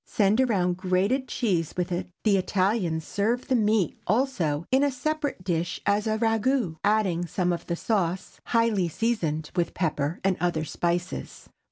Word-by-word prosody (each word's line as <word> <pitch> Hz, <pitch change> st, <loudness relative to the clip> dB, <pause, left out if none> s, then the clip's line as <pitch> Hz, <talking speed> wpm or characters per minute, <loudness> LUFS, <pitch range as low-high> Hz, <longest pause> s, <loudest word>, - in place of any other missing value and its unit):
Send 210 Hz, +3 st, +3 dB
around 185 Hz, -8 st, +1 dB
grated 195 Hz, +8 st, +1 dB
cheese 180 Hz, -, -1 dB
with 180 Hz, 0 st, -1 dB
it. 175 Hz, +1 st, -2 dB
The 210 Hz, -2 st, +4 dB
Italians 185 Hz, -4 st, 0 dB
serve 230 Hz, +5 st, -1 dB
the 260 Hz, -, +2 dB
meat 215 Hz, -6 st, +1 dB
also 180 Hz, -, 0 dB
in 265 Hz, +2 st, +4 dB
a 285 Hz, -, +3 dB
separate 290 Hz, -4 st, -2 dB
dish 175 Hz, -1 st, -1 dB
as 205 Hz, +2 st, +1 dB
a 215 Hz, 0 st, +1 dB
ragoût, 225 Hz, -4 st, +1 dB
adding 190 Hz, -5 st, +1 dB
some 180 Hz, +1 st, 0 dB
of 170 Hz, -, -6 dB
the 170 Hz, -, -1 dB
sauce, 185 Hz, -2 st, -2 dB
highly 230 Hz, -6 st, +2 dB
seasoned 160 Hz, -7 st, -1 dB
with 175 Hz, -1 st, 0 dB
pepper 155 Hz, -2 st, -1 dB
and 190 Hz, -1 st, +2 dB
other 165 Hz, -2 st, 0 dB
spices. 175 Hz, +3 st, -3 dB
190 Hz, 160 wpm, -26 LUFS, 175-225 Hz, -, The